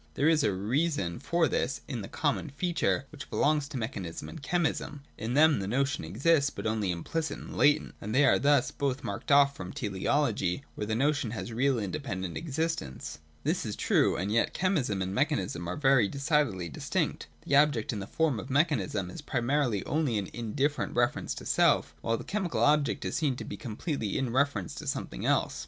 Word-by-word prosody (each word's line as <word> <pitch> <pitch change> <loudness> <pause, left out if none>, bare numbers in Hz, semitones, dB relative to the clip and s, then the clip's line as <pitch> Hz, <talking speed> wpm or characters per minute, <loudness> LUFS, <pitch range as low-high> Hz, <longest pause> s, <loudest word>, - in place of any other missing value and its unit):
There 145 - +2
is 160 -2 +4
a 105 - +3
reason 105 - -1
for 170 -1 +1
this 135 +1 -1
in 125 -6 -4
the 95 - -6
common 150 +1 -1
feature 155 -2 0
which 150 -2 -9
belongs 150 -1 +2
to 140 -2 -6
mechanism 100 -8 -5
and 160 - -9
chemism. 150 -2 -1
In 115 +3 -3
them 155 -2 +5
the 95 - -3
notion 135 +2 0
exists, 140 - +2
but - - -8
only 110 -3 0
implicit 155 - -2
and - - -9
latent, 150 +1 +3
and 105 +3 -3
they 140 +2 +6
are - - +4
thus 140 -2 +3
both 140 -1 -2
marked 100 +4 -4
off 140 0 +6
from 90 -5 -7
teleology 105 +1 0
where 105 - -4
the 110 - 0
notion 135 -1 +1
has 115 +1 -5
real 130 +2 +2
independent 95 - -3
existence. 160 - -3 0.2
This - - 0
is - - -4
true: - - +2
and 95 +3 -2
yet 115 - +1
chemism 145 - +1
and 95 +1 -4
mechanism 100 - -1
are 90 - -3
very 135 -6 +4
decidedly 140 - 0
distinct. 75 - -2 0.2
The 140 - +4
object, 145 -7 +3
in 105 - -3
the 95 - -6
form 155 -8 +1
of 105 - -8
mechanism, 120 - +1
is - - -8
primarily 120 -3 0
only 145 -7 0
an 100 - -1
in 110 +1 -6
different 145 +1 0
reference 120 0 0
to - - -8
self, - - +3
while 115 0 0
the - - -7
chemical 190 -4 -1
object 150 -1 +2
is - - -1
seen 145 -5 +1
to - - -7
be - - -6
completely 115 - -3
in 130 -3 -1
reference 130 -9 +1
to - - -7
something - - -3
else. - - +1
135 Hz, 195 wpm, -29 LUFS, 105-150 Hz, 0.2 s, they